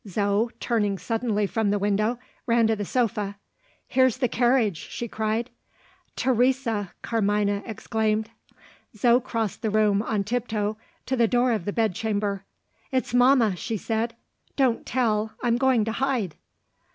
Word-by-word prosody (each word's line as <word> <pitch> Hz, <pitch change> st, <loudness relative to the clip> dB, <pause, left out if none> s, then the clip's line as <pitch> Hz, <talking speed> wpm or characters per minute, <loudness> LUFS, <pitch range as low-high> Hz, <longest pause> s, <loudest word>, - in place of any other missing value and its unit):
Zo, 205 Hz, +3 st, +1 dB
turning 210 Hz, -5 st, 0 dB
suddenly 220 Hz, +2 st, -1 dB
from 215 Hz, +1 st, 0 dB
the 205 Hz, -, +2 dB
window, 205 Hz, +4 st, +1 dB, 0.3 s
ran 230 Hz, -1 st, +4 dB
to 220 Hz, 0 st, +2 dB
the 205 Hz, -1 st, -4 dB
sofa. 215 Hz, -4 st, -1 dB, 0.5 s
"Here's 260 Hz, -2 st, +3 dB
the 255 Hz, -1 st, +1 dB
carriage!" 240 Hz, -5 st, +2 dB
she 235 Hz, -, -4 dB
cried. 220 Hz, +2 st, -2 dB, 0.6 s
"Teresa!" 245 Hz, -5 st, +1 dB
Carmina 205 Hz, -2 st, +1 dB
exclaimed. 220 Hz, 0 st, -1 dB, 0.7 s
Zo 240 Hz, +3 st, +5 dB
crossed 230 Hz, -5 st, -3 dB
the 220 Hz, -, 0 dB
room, 210 Hz, -1 st, +3 dB
on 215 Hz, -2 st, -1 dB
tiptoe, 215 Hz, -1 st, -1 dB, 0.3 s
to 260 Hz, -, 0 dB
the 235 Hz, -2 st, +3 dB
door 245 Hz, +2 st, +2 dB
of 215 Hz, -7 st, -1 dB
the 205 Hz, -, -1 dB
bed 220 Hz, -2 st, +1 dB
chamber. 205 Hz, -1 st, -2 dB, 0.5 s
"It's 260 Hz, -2 st, -1 dB
mamma," 245 Hz, -5 st, +5 dB
she 220 Hz, +5 st, -3 dB
said. 225 Hz, +3 st, -2 dB, 0.4 s
"Don't 260 Hz, -4 st, +1 dB
tell! 220 Hz, -3 st, 0 dB
I'm 240 Hz, -1 st, +2 dB
going 255 Hz, -5 st, +3 dB
to 225 Hz, -, -1 dB
hide." 240 Hz, -, -1 dB
225 Hz, 145 wpm, -25 LUFS, 205-240 Hz, 0.7 s, Zo